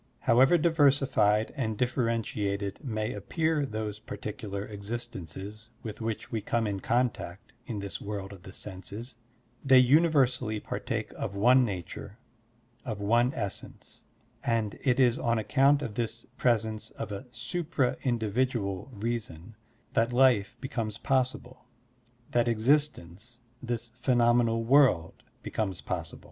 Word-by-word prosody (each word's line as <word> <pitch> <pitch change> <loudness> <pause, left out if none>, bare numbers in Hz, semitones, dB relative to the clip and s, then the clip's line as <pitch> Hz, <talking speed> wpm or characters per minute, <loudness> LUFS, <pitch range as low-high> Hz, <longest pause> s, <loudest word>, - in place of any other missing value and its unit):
However 130 +8 +5
diversified 140 -9 +3
and 110 -6 -2
diflferentiated 110 -5 -1
may 110 -5 -2
appear 155 - 0
those 110 -2 -4
particular 105 -1 -6
exist 115 +4 -5
ences 100 +5 -8
with 110 0 -7
which 110 -1 -4
we 110 - -1
come 115 +2 0
in 100 -2 -2
contact 115 -4 -1
in 115 - -4
this 100 -1 -5
world 100 -1 -5
of 95 - -12
the 95 - -11
senses, 105 +6 -7 0.5
they 135 -1 +6
universally 130 -5 +4
partake - - -4
of 100 - -4
one 125 +6 +5
nature, 100 0 -5 0.7
of 110 -5 -4
one 120 +5 +3
essence; 100 -4 -7 0.4
and 115 -3 0
it 130 -2 +2
is 125 -3 +4
on 115 0 +1
account 140 +6 +3
of 115 - -4
this 115 0 -3
presence 110 -3 0
of - - -5
a 105 +6 -6
supra 150 -2 -1
individual 115 -3 -1
reason 110 -4 -4 0.4
that 115 +2 +2
life 120 -4 +3
becomes 115 -6 -3
possible, 130 -1 -1 0.7
that 120 0 +2
existence, 120 - 0 0.2
this 120 -2 -3
phe 125 +1 0
nomenal 120 -1 +3
world, 130 - +4 0.2
becomes 95 -5 -2
possible. 85 -4 -4
115 Hz, 130 wpm, -29 LUFS, 105-125 Hz, 0.7 s, they